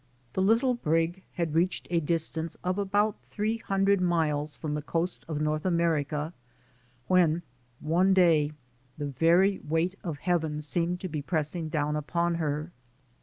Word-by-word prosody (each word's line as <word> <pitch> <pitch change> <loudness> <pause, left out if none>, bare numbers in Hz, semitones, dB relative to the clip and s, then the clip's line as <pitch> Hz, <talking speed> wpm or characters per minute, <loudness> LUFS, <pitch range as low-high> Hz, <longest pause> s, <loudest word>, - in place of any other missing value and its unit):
The 190 - 0
little 230 +6 +3
brig 165 -3 0
had 170 -3 -2
reached 170 +3 +1
a 170 - +3
distance 165 0 -2
of 185 +2 0
about 205 +2 +1
three 215 +2 -2
hundred 195 -2 +1
miles 155 -4 +1
from 150 +3 -3
the 150 - -2
coast 170 +4 -2
of 155 -2 -3
North 155 0 0
Amer 170 -4 +2
ica, 150 +3 -4 0.7
when 175 -2 +3 0.4
one 175 +5 +3
day 165 -5 +4 0.4
the 145 - -3
very 170 +8 +3
weight 165 +4 0
of 165 -5 -4
heaven 160 -2 0
seemed 175 +3 -1
to 185 - -3
be 155 -4 -4
pressing 160 +1 -2
down 150 -1 0
upon 170 +3 0
her. 150 +2 -2
165 Hz, 155 wpm, -28 LUFS, 150-185 Hz, 0.7 s, day